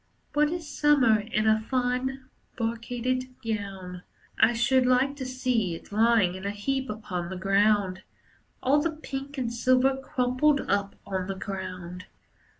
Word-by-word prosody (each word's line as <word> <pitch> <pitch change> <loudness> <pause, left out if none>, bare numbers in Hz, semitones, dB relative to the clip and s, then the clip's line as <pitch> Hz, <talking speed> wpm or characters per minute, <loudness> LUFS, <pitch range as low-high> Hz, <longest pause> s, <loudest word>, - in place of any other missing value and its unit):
What 295 0 +3
is 335 -1 -4
Summer 285 -7 +4
in 215 +1 -1
a 220 0 +4
fine 260 +1 -1 0.3
brocaded 245 +2 -2
gown! 195 -5 -4 0.4
I 240 - +5
should 250 +2 +3
like 255 +3 +3
to 260 -2 -4
see 250 -8 0
it - - -13
lying 220 -3 +3
in 185 0 -8
a 200 - -1
heap 265 +6 -2
upon 200 -5 -4
the 190 - -5
ground. 195 0 +2 0.6
All 285 +3 +4
the 335 - +1
pink 280 -3 -6
and 240 -3 -2
silver 255 +3 +3
crumpled 265 +2 +1
up 200 0 -1
on 190 -2 -3
the 195 - -3
ground. 185 -2 -6
235 Hz, 150 wpm, -27 LUFS, 200-260 Hz, 0.6 s, I